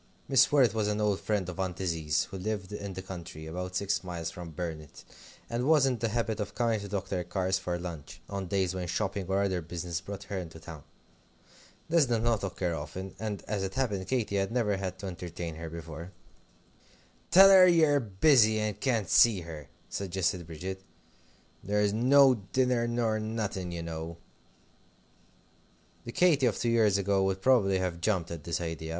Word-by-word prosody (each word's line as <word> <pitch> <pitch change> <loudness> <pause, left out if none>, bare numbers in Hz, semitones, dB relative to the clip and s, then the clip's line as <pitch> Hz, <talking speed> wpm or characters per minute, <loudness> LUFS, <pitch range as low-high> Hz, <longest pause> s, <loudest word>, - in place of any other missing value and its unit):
Mrs. 135 0 +5
Worrett 135 -6 +4
was 110 -2 0
an 105 0 -1
old 105 -2 +1
friend 105 -4 -1
of 90 +1 -7
Aunt 95 -2 -2
Izzie's, 80 -5 0
who 95 - -5
lived 100 -1 -3
in 100 -1 -5
the 95 +1 -7
country, 85 -4 -8
about 90 +3 -5
six 100 +1 0
miles 85 -3 -5
from 85 -1 -8
Burnet, 80 -2 -7 0.4
and 120 +3 -2
was 150 -3 +5
in 125 -3 0
the 115 0 0
habit 115 -1 -1
of 105 -1 -4
coming 115 -2 +1
to 100 - -7
Dr. 95 -2 -3
Carr's 95 +1 -1
for 90 -2 -3
lunch, 85 -2 -8
on 100 -2 -4
days 95 -1 0
when 90 -1 -4
shopping 100 +1 -2
or 95 +1 +1
other 95 -3 0
business 85 +1 -5
brought 100 0 -7
her 100 -1 -4
into 80 -2 -8
town. 80 -2 -10 1.1
This 165 -4 +3
did 115 -2 0
not 115 -4 +1
occur 90 -2 -2
often; 80 +5 -6
and, 105 -2 -4
as 105 -2 -2
it 95 0 -4
happened, 105 -8 -1
Katy 115 -6 0
had 95 +2 0
never 110 -5 +1
had 95 -1 -4
to 100 - -8
entertain 85 -2 -6
her 80 0 -6
before. 85 +1 -8 1.2
"Tell 195 +2 +9
her 185 -1 +9
ye're 160 -5 +4
busy, 110 0 +4
and 105 -1 -2
can't 115 -6 0
see 110 -6 +5
her," 80 -4 -9 0.2
suggested 90 -2 -2
Bridget; 95 +4 -6 0.8
"there's 105 0 +1
no 130 +4 +6 0.2
dinner 125 -2 +2
nor 115 -2 0
nothing, 110 -5 -3
you 85 -1 -5
know." 80 0 -6 1.9
The 120 - -5
Katy 150 -3 +4
of 115 - 0
two 120 - 0
years 110 -4 +4
ago 100 0 +1
would 95 0 0
probably 105 -8 +4
have 90 -2 -3
jumped 90 -3 0
at 85 -2 -7
this 85 - -1
idea. 80 -1 -5
95 Hz, 185 wpm, -29 LUFS, 85-110 Hz, 1.9 s, Tell